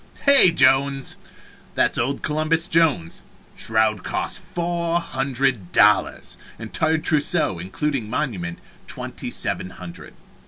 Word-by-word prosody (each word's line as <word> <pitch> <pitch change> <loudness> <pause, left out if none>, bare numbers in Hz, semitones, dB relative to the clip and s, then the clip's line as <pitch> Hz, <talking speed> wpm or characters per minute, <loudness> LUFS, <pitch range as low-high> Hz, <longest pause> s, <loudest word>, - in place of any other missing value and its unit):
Hey, 280 -9 +7
Jones! 135 -2 +2 0.6
That - - +2
is - - -3
old 130 +4 -2
Columbus 155 +2 +1
Jones 150 - +1 0.3
shroud 110 -2 0
cost - - -1
four 170 0 -1
hundred 135 - -2
dollars 105 +1 +2 0.2
entire 160 0 0
trousseau, 155 - +1
including 115 - -3
monument, 105 - -3 0.3
twenty - - -6
seven 90 - -3
hundred. 90 -2 -11
135 Hz, 110 wpm, -22 LUFS, 110-160 Hz, 0.6 s, Hey